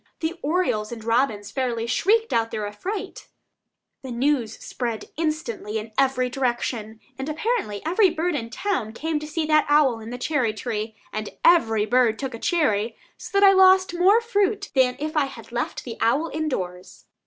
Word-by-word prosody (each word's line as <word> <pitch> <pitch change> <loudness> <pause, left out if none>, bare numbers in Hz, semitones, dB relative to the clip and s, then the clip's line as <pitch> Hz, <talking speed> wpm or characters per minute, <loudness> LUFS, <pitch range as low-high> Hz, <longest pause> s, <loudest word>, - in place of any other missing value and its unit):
The 320 +1 -1
orioles 285 -10 0
and 230 -2 -7
robins 225 -3 0
fairly 240 -4 -1
"shrieked 440 - +2
out 230 0 +1
their 215 -2 -3
affright." 365 - -6 0.7
The 265 - -8
news 250 -1 0 0.6
instantly 305 -9 -3
spread - - -4
in 225 - -18
every 265 -1 +2
direction, 240 -3 -2 0.2
and 265 +3 -3
apparently 310 - -2
every 370 +4 +4
bird 340 +2 -1
in 230 -6 -3
town 245 - -2
came 310 +4 -2
to 305 - -7
see 315 +1 -2
that 305 0 +3
owl 290 -6 +4
in 220 0 -9
the 245 - -5
cherry 250 -4 0
tree, 220 0 -4 0.2
and 215 0 -3 0.2
every 225 -11 +4
bird 240 -1 +3
took 270 -2 -4
a 230 - -7
cherry, 230 - 0 0.2
so 395 - -2
that 400 - +7
I - - +8
lost 375 -1 +5
more 380 +6 +4
fruit 410 -3 0
than 255 -2 +3
if 310 +2 -4
I 300 -2 +3
had 245 -5 -11
left 240 +1 -3
the 235 -3 -7
owl 280 +8 +2
in 310 0 -2
doors. 180 -7 -6
265 Hz, 180 wpm, -24 LUFS, 225-330 Hz, 0.7 s, I